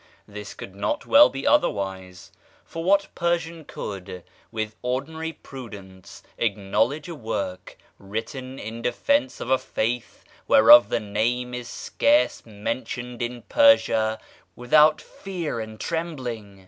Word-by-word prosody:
This 105 -1 -9
could 95 - -9
not 100 +1 -2
well 290 +1 +7
be 135 - -6
otherwise; 95 -2 0 0.3
for 165 - -6
what 200 +2 +2
Persian 170 -1 -1
could, 95 -2 -7 0.3
with 110 -1 -4
ordinary 155 +6 -3
prudence, 100 - -11 0.2
acknowledge 115 +7 0
a 170 - -6
work 100 - -5 0.2
written 115 +6 -6
in 115 +1 -7
defence 275 - 0
of 125 - -4
a 130 - +4
faith 120 +2 -3 0.2
whereof 115 0 +8
the 120 - 0
name 115 +4 -1
is 125 -1 -6
scarce 295 +1 +1
mentioned 120 +3 -5
in 120 0 -4
Persia 115 - +4 0.4
without 150 +5 +4
fear 175 -8 -5
and 110 -1 -7
trembling? 125 - -4
120 Hz, 120 wpm, -24 LUFS, 105-155 Hz, 0.4 s, whereof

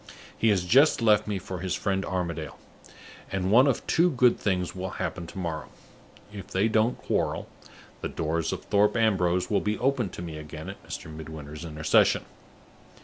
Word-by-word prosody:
He 115 - +2
has 95 -4 +2
just 135 - +5
left 105 -2 +4
me 105 -2 -1
for 95 -1 -6
his 90 0 -2
friend 95 -1 -1
Armadale; 85 -6 -3 0.7
and 95 -1 -1
one 125 +5 +7
of 135 - 0
two 175 +2 +3
good 125 -5 +3
things 90 -3 -1
will 95 0 -4
happen 85 -1 -4
to 100 - -11
morrow. 85 -4 -4 0.6
If 100 -2 -8
they 95 +4 +1
don't 110 +2 +2
quarrel, - - -1 0.5
the - - -3
doors 80 0 -1
of - - -5
Thorpe 105 +2 +3
Ambrose 90 -5 +2
will 105 - +3
be 105 +1 -1
opened 125 -6 0
to 85 - -6
me 80 -3 -6
again 75 +1 -8
at - - -15
Mr. 80 - -7
Midwinter's 75 0 -8
intercession. 75 -2 +2
95 Hz, 175 wpm, -27 LUFS, 85-110 Hz, 0.7 s, one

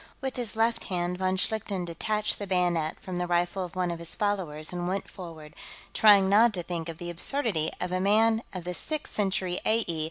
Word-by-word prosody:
With 265 -1 -4
his 235 -5 -2
left 225 +1 +1
hand, 180 -1 -2
von 185 0 +1
Schlichten 200 -2 0
detached 210 +5 -1
the 205 - -4
bayonet 175 -4 +1
from 185 -1 -5
the 180 0 -1
rifle 175 +2 0
of 180 0 -8
one 180 -1 0
of 170 - -5
his 170 -1 -2
followers 180 -8 -1
and 175 0 -2
went 190 +2 -2
forward, 160 -4 -10 0.4
trying 205 -3 +6
not 215 +3 +5
to 175 - -3
think 170 -1 -4
of 165 - -6
the 175 0 -5
absurdity 180 - 0
of 180 - -3
a 185 - 0
man 220 +3 +4
of 185 -2 -6
the 180 +1 -4
Sixth 305 - -3
Century 190 -3 0
A.E. 215 -7 +1
185 Hz, 210 wpm, -28 LUFS, 175-210 Hz, 0.4 s, trying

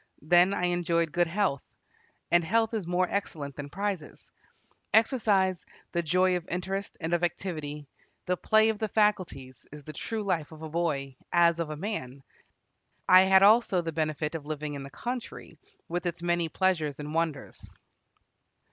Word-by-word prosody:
Then 175 +4 +5
I 180 - -2
enjoyed 170 -2 +1
good 175 +2 +2
health, 180 -6 0 0.7
and 175 0 +5
health 225 +6 +1
is 210 -6 -3
more 180 +1 +1
excellent 150 -9 -4
than 145 -1 -7
prizes. 195 -2 -5 0.6
Exercise, 205 - +2 0.3
the 170 - 0
joy 180 +3 +2
of 175 -1 -4
interest 190 +3 -4
and 165 0 -3
of 175 0 +1
activity, 155 -4 -3 0.4
the 180 - +1
play 220 +4 +3
of 220 -2 -2
the 220 - -1
faculties, 185 - -1
is 150 0 -10
the 155 - -9
true 220 +8 -4
life 165 -7 -1
of 160 0 -11
a 160 - -6
boy, 145 -5 -2
as 170 -1 +4
of 165 -2 -2
a 155 - -5
man. 140 - -5 0.8
I 185 0 +8
had 190 0 +6
also 210 -3 +5
the 165 -1 -4
benefit 155 -1 -2
of 160 -3 -5
living 150 -1 -4
in 140 - -6
the 135 - -8
country, 235 - -6 0.3
with 175 +1 -2
its 170 0 -4
many 175 -1 0
pleasures 160 -5 0
and 150 +1 -6
wonders." 160 -4 -3
175 Hz, 165 wpm, -28 LUFS, 155-190 Hz, 0.8 s, I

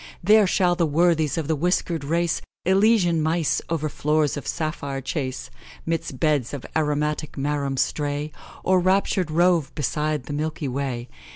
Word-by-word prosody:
There 210 +2 +6
shall 180 -1 +2
the 170 -2 +1
worthies 160 -1 +2
of 160 -3 -2
the 160 - +1
whiskered 170 0 0
race 170 +3 0 0.2
Elysian 190 -3 +3
mice 160 0 +1
o'er 160 -2 -1
floors 150 0 0
of 145 - -6
sapphire 150 -4 -3
chase, 135 -1 -4 0.3
Midst 165 -5 -3
beds 145 -4 +1
of 135 - -8
aromatic 150 0 0
marum 140 -1 -1
stray, 145 +2 -1 0.3
Or 185 0 +3
raptur'd 185 -1 +1
rove 170 -1 +2
beside 150 0 -1
the 145 - -6
milky 155 0 -2
way. 130 -2 -3
155 Hz, 150 wpm, -24 LUFS, 145-170 Hz, 0.3 s, There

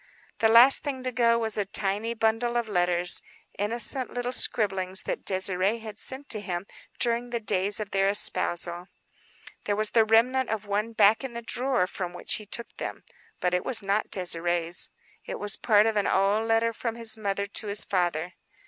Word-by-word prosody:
The 220 - +3
last 240 +4 +7
thing 270 -3 -5
to 255 - -2
go 235 -1 +3
was 225 -2 -1
a 205 - +1
tiny 205 +4 -2
bundle 225 +2 0
of 235 -1 -1
letters; 175 -2 +1 0.4
innocent 235 +5 -2
little 245 0 -3
scribblings 190 -6 0
that - - -4
Désirée 190 +3 0
had 215 -1 -9
sent 270 +2 -6
to 215 - 0
him 180 -2 -5 0.3
during 235 +1 -1
the 240 -1 -2
days 200 -1 0
of 210 -2 -5
their 195 0 +2
espousal. 175 -3 +3 0.8
There 205 - 0
was 215 0 -1
the 225 - +5
remnant 240 +4 +2
of 215 -1 -3
one 210 +3 -2
back 215 +3 +4
in 255 -3 -6
the 235 - -6
drawer 250 -3 0
from 180 -1 -6
which 175 - -2
he 210 - -14
took 235 +3 -5
them. - - -6 0.4
But 180 0 0
it 180 - 0
was 235 -5 +2
not 200 +2 -1
Désirée's; 175 -1 0 0.4
it - - -4
was 205 0 0
part 210 -2 +3
of 225 -1 0
an 205 -1 +1
old 205 +3 +1
letter 225 0 +2
from 230 0 -4
his 230 -2 +2
mother 200 -2 -2
to 205 +2 -3
his 205 0 +1
father. 175 -2 -1
215 Hz, 190 wpm, -26 LUFS, 195-230 Hz, 0.8 s, last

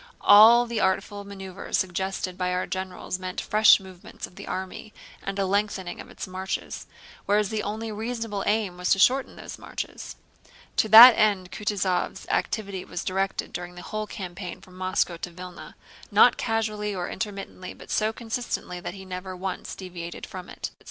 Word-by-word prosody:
All 225 +4 +8
the 235 -2 -3
artful 200 +1 0
maneuvers 195 -1 -4
suggested 190 0 -2
by 180 0 -1
our 180 - 0
generals 185 -1 -4
meant 185 0 -4
fresh 215 0 +6
movements 190 -2 -10
of - - -17
the - - -10
army 190 +3 -6 0.3
and 195 0 -4
a 195 - +1
lengthening 195 -2 -1
of - - -13
its - - -7
marches, 185 0 -5 0.4
whereas 205 0 +3
the 220 -1 -1
only 220 +2 -4
reasonable 225 -2 -3
aim 205 -4 0
was 180 0 -2
to - - 0
shorten 260 +7 +3
those - - -9
marches. - - -6 0.6
To 220 - +3
that 230 +4 +13
end 205 -5 +1
Kutúzov's 195 -4 -1
activity 200 -4 -1
was 175 - -5
directed 195 +1 -2
during 175 0 -6
the 175 - -9
whole 215 0 -4
campaign 185 -3 -7
from 185 - -17
Moscow 185 -2 0
to 175 - -5
Vílna—not 180 +1 0
casually 215 -2 -1
or 180 -1 -3
intermittently 195 -3 -6
but - - -12
so 215 0 +2
consistently 225 -5 -4
that 175 +1 -6
he 190 -1 -10
never 185 0 -6
once 185 0 -5
deviated 175 -2 -7
from 185 -1 -9
it. - - -6
195 Hz, 165 wpm, -26 LUFS, 185-215 Hz, 0.6 s, that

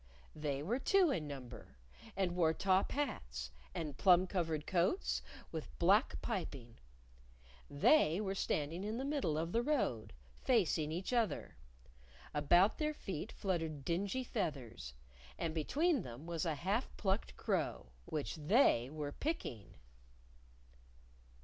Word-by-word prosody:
They 145 -2 -2
were 230 - 0
two 370 +2 +4
in 160 - -2
number, 125 - -9 0.4
and 185 -3 0
wore 160 -3 +3
top 190 +1 +2
hats, 60 - -3 0.2
and 150 -4 -4
plum 185 -2 +6
covered 165 -5 -1
coats 185 - +1 0.3
with 160 -2 -6
black 200 +8 +4
piping. 140 - -4 0.9
They 160 - +4
were 195 -2 -1
standing 165 -1 -1
in 215 +2 -2
the 265 - -2
middle 280 - 0
of 165 +2 -1
the 230 - +2
road, 240 - 0 0.3
facing 175 - +2
each 180 +9 -3
other. 225 -9 0 0.8
About 175 +7 +4
their 305 -1 0
feet 190 - -5
fluttered 160 -8 -2
dingy 200 +9 -1
feathers. 125 - -4 0.4
And 165 -2 -2
between 285 - +1
them 125 -1 -9
was 170 -1 -2
a 160 - 0
half 195 - -1
plucked 195 +1 -1
crow, - - -1
which 150 +1 -3
They 150 - +4
were 150 -1 -4
picking. 145 - -4
170 Hz, 130 wpm, -36 LUFS, 150-215 Hz, 0.9 s, plum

